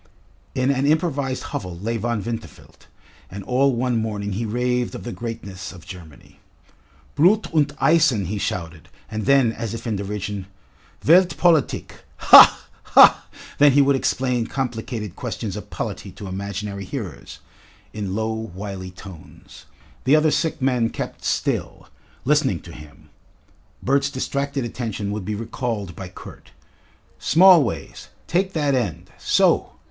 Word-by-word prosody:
In 130 +2 +2
an 140 +1 0
improvised 145 -4 0
hovel 90 -3 -6
lay 115 +6 -3
Von 115 -2 -2
Winterfeld, 115 +2 -8 0.4
and 100 +2 -8
all 130 +3 +2
one 125 0 0
morning 105 -2 -3
he 110 +4 -3
raved 125 +2 -1
of - - -8
the 120 - -5
greatness 110 -6 -7
of 90 -3 -14
Germany. 85 -6 -13 0.7
"Blut 185 +7 +3
und 150 -3 +2
Eisen!" 155 - +3
he 100 +4 -3
shouted, 85 -4 -5 0.2
and 110 +1 -4
then, 135 -4 +4
as 115 -1 -5
if 115 - -8
in 115 -3 -1
derision, 100 -1 -5 0.6
"Welt 180 +3 +5
Politik 165 -6 +1
ha, - - +8
ha!" - - +6 0.3
Then 145 -1 +6
he 145 - +5
would 140 0 +3
explain 125 -3 0
complicated 115 -6 -4
questions - - -5
of - - -8
polity - - -5
to - - -10
imaginary 100 +1 -5
hearers, 100 - -7 0.6
in 100 -3 -4
low, 110 +1 -1
wily 100 -3 -6
tones. 90 -2 -14 0.4
The 135 +4 +5
other 155 0 +3
sick 160 0 -1
men 125 -4 +1
kept - - -6
still, - - -2 0.4
listening 140 - +2
to 85 - -12
him. 75 -2 -14 0.7
Bert's 140 +2 +2
distracted 140 0 -3
attention 110 -4 -4
would 105 -2 -4
be 105 +1 -3
recalled 110 -4 -4
by 95 -2 -8
Kurt. 90 - -13 0.7
"Smallways, 165 - +3 0.2
take 190 +2 0
that 145 -3 0
end. 115 -10 -2
So!" - - +2
115 Hz, 140 wpm, -22 LUFS, 100-140 Hz, 0.7 s, ha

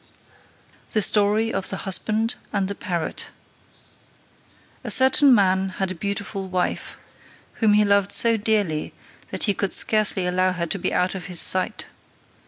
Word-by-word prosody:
The 215 - +2
Story 210 +3 +2
of 190 - -2
the 190 - -4
Husband 215 +4 0 0.2
and 195 -2 -1
the 200 - -4
Parrot. 180 -6 -4 1.5
A - - -6
certain 265 +1 +5
man 190 -2 +1
had 190 -1 -2
a - - -3
beautiful 200 +1 -5
wife, 185 -1 -3 0.6
whom 215 -2 +3
he 210 0 +3
loved 200 -1 +1
so 230 -1 +4
dearly, 205 -8 -1 0.3
that - - -4
he 205 - +1
could 195 0 -2
scarcely 210 -4 +3
allow 185 +1 0
her 175 -1 -3
to 180 +4 -4
be - - -2
out 180 0 0
of 185 -2 -7
his 180 -3 -2
sight. 185 0 -1
200 Hz, 155 wpm, -22 LUFS, 185-215 Hz, 1.5 s, certain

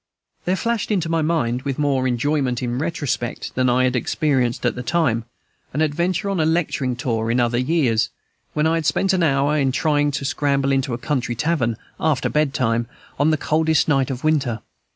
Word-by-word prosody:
There 185 - +2
flashed 230 +2 -1
into 180 -6 0
my 165 -1 +1
mind, 150 -7 0
with 135 -1 -3
more 135 -3 +1
enjoyment 130 0 0
in 120 - -1
the - - -1
retrospect 145 -7 -3
than 130 0 +2
I 125 +1 +3
had 130 0 +1
experienced 125 -1 0
at - - +2
the 125 - -5
time, 125 -6 0 0.5
an 145 - 0
adventure 170 +6 0
on 190 - -1
a - - +3
lecturing 155 -6 0
tour 115 -3 -2
in 120 +2 +2
other 120 0 +1
years, 130 -5 +1 0.5
when 150 0 +2
I 160 - +3
had 165 -3 0
spent 190 +7 +2
an 185 - +1
hour 145 -1 +2
in 135 -2 +2
trying 145 +1 +1
to 140 0 -3
scramble 140 0 +1
into 135 -2 0
a - - -5
country 125 -3 -2
tavern, 120 -5 0 0.2
after 155 -5 +1
bed 150 -2 +1
time, 115 -3 +1 0.3
on 145 - +4
the 155 - +2
coldest 160 +1 +2
night 135 -4 +2
of 130 -2 -5
winter. 140 -8 +1
140 Hz, 200 wpm, -21 LUFS, 125-155 Hz, 0.5 s, on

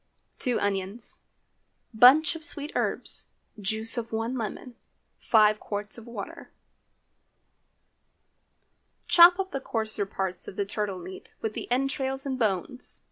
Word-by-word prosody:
2 250 -3 0
onions. 200 +2 -3 0.7
Bunch 265 +9 +6
of 320 - -8
sweet 295 -1 -2
herbs. - - -3 0.3
Juice 220 +4 0
of 230 -1 -7
one 225 +2 -2
lemon. 245 +1 -5 0.5
5 215 -1 +4
qts 205 0 -3
of 230 - -14
water. 220 -4 -8 2.6
Chop 350 +1 +8
up 385 -1 -3
the 275 - -3
coarser 220 -4 -2
parts 190 -2 -4
of - - -8
the 200 - -1
turtle 200 -1 -3
meat, 180 +1 -10
with 220 -1 -2
the - - -6
entrails 270 +1 -1
and 265 -2 -3
bones. 220 +4 -2
225 Hz, 130 wpm, -27 LUFS, 205-265 Hz, 2.6 s, Chop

